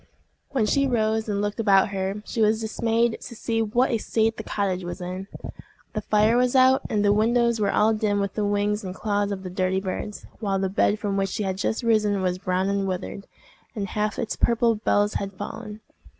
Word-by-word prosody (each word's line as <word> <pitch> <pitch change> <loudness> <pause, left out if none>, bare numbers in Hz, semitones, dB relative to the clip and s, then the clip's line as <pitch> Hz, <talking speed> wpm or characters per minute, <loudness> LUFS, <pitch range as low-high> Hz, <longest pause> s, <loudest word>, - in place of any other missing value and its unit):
When 260 -6 +1
she 275 +6 +2
rose 220 -2 0
and 200 0 0
looked 205 +1 -3
about 200 -4 +4
her, 195 +1 -3
she 230 - -3
was 215 0 +3
dismayed 225 +1 0
to 235 - -9
see 225 0 -1
what 235 +5 +1
a 230 - +1
state 225 +1 +1
the - - -4
cottage 190 -4 -2
was 175 +2 -6
in. 185 +2 -5 0.7
The 215 - -2
fire 215 +2 +3
was 250 +1 +2
out, 260 0 +5
and 210 -1 +1
the 205 - +5
windows 235 +2 +2
were 200 - +2
all 220 +1 +3
dim 210 -1 0
with 200 -1 -2
the 215 - -1
wings 205 +1 0
and 185 -1 -6
claws 205 -1 -1
of 190 -1 -4
the 185 - -6
dirty 185 +1 0
birds, 195 +2 -5
while 200 -3 0
the 190 0 0
bed 205 +2 +2
from 200 -1 -2
which 195 0 0
she 210 - -3
had 190 -1 -2
just 220 +4 -1
risen 210 -4 +2
was 180 0 0
brown 185 +1 0
and 200 0 0
withered, 190 +1 -5 0.5
and 200 -3 -3
half 210 +1 -1
its 225 - -2
purple 235 0 +2
bells 205 -1 +1
had 200 0 -3
fallen. 210 +2 -7
210 Hz, 215 wpm, -25 LUFS, 195-225 Hz, 0.7 s, out